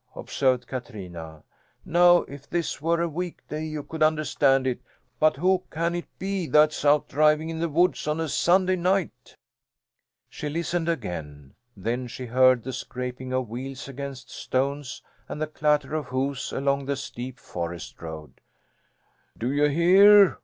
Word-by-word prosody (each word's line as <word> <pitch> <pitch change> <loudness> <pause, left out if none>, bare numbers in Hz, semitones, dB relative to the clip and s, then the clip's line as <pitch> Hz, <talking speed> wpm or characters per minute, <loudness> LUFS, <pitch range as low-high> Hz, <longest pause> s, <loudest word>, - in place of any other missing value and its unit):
observed 130 -2 0
Katrina. 90 - -8 0.4
"Now 175 +1 +5
if 140 0 -12
this 170 -4 -2
were 170 +2 +1
a - - 0
weekday 165 -2 -5
you 155 -2 -5
could 160 +2 -8
understand 150 -3 +3
it; 130 -2 -1 0.4
but 155 -2 +4
who 185 +5 +2
can 170 +2 -1
it 175 0 -4
be 190 -3 -2
that's 150 0 +3
out 145 0 +4
driving 155 +2 +2
in 160 - -5
the 170 0 0
woods 170 +1 +1
on 150 +1 0
a 160 - -1
Sunday 185 +4 +2
night?" 185 0 -1 0.9
She 150 - -6
listened 170 +2 -1
again. 75 - -5 0.2
Then 120 +6 -2
she 125 +1 -7
heard 130 0 +4
the 130 - -5
scraping 125 +1 -5
of 130 -1 -1
wheels 130 +4 -6
against 140 -1 -7
stones 140 +1 -2 0.3
and - - -5
the 155 - 0
clatter 150 -1 0
of 155 -3 -2
hoofs 130 +1 -2
along 140 0 0
the 140 - 0
steep 130 -2 -7
forest 85 -1 -6
road. 80 -2 -9 1.0
"Do 120 +3 -2
you 145 +1 +3
hear?" 190 +6 +6
145 Hz, 155 wpm, -25 LUFS, 130-165 Hz, 1.0 s, hear